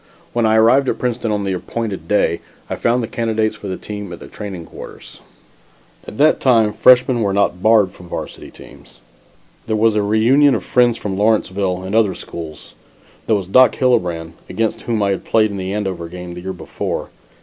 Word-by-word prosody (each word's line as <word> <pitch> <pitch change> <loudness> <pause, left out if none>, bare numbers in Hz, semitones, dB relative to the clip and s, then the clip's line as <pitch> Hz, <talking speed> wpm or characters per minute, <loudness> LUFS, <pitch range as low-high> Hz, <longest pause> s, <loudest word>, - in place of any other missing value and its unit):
When 120 -2 +2
I 110 - +3
arrived 125 +5 +4
at - - -1
Princeton 120 -2 -2
on 105 -1 -1
the 95 -1 -1
appointed 105 +2 -4
day, 95 -5 +1 0.3
I - - 0
found 120 +1 +1
the - - -3
candidates 110 -2 -1
for 105 - -9
the 95 - -4
team 105 -3 -7
at 85 - -8
the - - -10
training 95 -5 -7
quarters. - - -12 0.9
At - - -9
that 155 +2 +4
time 115 -5 +3
freshmen 125 +2 +5
were 100 -2 0
not 100 -3 +1
barred 110 -3 +4
from 90 -1 -15
varsity - - -7
teams. - - -15 0.7
There 110 - 0
was 110 0 +3
a 105 - +2
reunion 120 +7 +4
of - - -3
friends 120 -2 +3
from 95 -2 -4
Lawrenceville 100 -3 0
and 95 +2 -6
other 110 -4 +3
schools. 80 -3 -9 0.5
There 110 - +3
was 100 -2 -2
Doc 125 +7 +5
Hillebrand, 90 -11 0 0.2
against 110 -1 -2
whom 115 -3 -1
I 100 - +1
had 95 - -3
played 110 -2 +2
in 100 - -5
the 95 0 -4
Andover 95 -5 -3
game 90 0 -8
the 90 - -8
year 95 +1 -4
before. 90 - -5
105 Hz, 195 wpm, -18 LUFS, 95-115 Hz, 0.9 s, freshmen